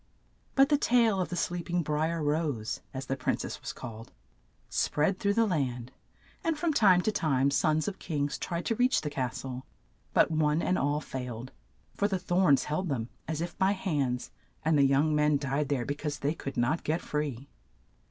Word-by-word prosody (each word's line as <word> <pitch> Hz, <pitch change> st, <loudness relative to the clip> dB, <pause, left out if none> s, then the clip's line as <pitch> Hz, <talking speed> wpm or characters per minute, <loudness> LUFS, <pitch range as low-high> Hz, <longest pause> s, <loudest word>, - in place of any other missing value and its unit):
But 270 Hz, 0 st, +6 dB
the 290 Hz, -2 st, +3 dB
tale 230 Hz, -7 st, +3 dB
of 180 Hz, -, -2 dB
the 180 Hz, -, -3 dB
sleep 175 Hz, 0 st, -2 dB
ing 175 Hz, 0 st, +1 dB
Bri 150 Hz, +1 st, 0 dB
er 165 Hz, -2 st, -2 dB
Rose, 145 Hz, -7 st, -1 dB
as 135 Hz, 0 st, -5 dB
the 135 Hz, -, -1 dB
prin 130 Hz, -, 0 dB
cess -, -, -6 dB
was -, -, -4 dB
called, 115 Hz, 0 st, -9 dB, 0.6 s
spread 185 Hz, +6 st, +1 dB
through 200 Hz, 0 st, +1 dB
the 230 Hz, 0 st, +4 dB
land, 130 Hz, -, -1 dB, 0.5 s
and 325 Hz, -2 st, 0 dB
from 325 Hz, 0 st, 0 dB
time 190 Hz, -8 st, +5 dB
to 215 Hz, -, +1 dB
time 140 Hz, -8 st, +2 dB
sons 155 Hz, +2 st, +2 dB
of 195 Hz, -2 st, -4 dB
kings 145 Hz, -4 st, -2 dB
tried 170 Hz, 0 st, -3 dB
to -, -, +1 dB
reach 250 Hz, +3 st, +3 dB
the 150 Hz, -, -4 dB
cas 130 Hz, -4 st, -2 dB
tle; 130 Hz, -1 st, -5 dB, 0.5 s
but -, -, +4 dB
one 155 Hz, 0 st, +2 dB
and 185 Hz, +2 st, +1 dB
all 145 Hz, +2 st, +1 dB
failed, 125 Hz, -3 st, -6 dB, 0.4 s
for 205 Hz, -, +1 dB
the 195 Hz, -2 st, 0 dB
thorns 180 Hz, -5 st, +3 dB
held 160 Hz, +4 st, -2 dB
them, 120 Hz, -4 st, -2 dB, 0.2 s
as 160 Hz, 0 st, -2 dB
if 175 Hz, +1 st, -4 dB
by 190 Hz, +1 st, +4 dB
hands, 140 Hz, -10 st, -1 dB, 0.3 s
and 160 Hz, 0 st, +4 dB
the 145 Hz, -, +5 dB
young 140 Hz, +3 st, +3 dB
men 150 Hz, -1 st, +3 dB
died 140 Hz, +1 st, -1 dB
there 130 Hz, -4 st, 0 dB
be 145 Hz, -, -1 dB
cause 145 Hz, 0 st, -4 dB
they 145 Hz, +2 st, 0 dB
could 140 Hz, -5 st, -7 dB
not 120 Hz, +8 st, +1 dB
get 160 Hz, +3 st, 0 dB
free. 145 Hz, -5 st, -3 dB
150 Hz, 200 wpm, -29 LUFS, 135-180 Hz, 0.6 s, But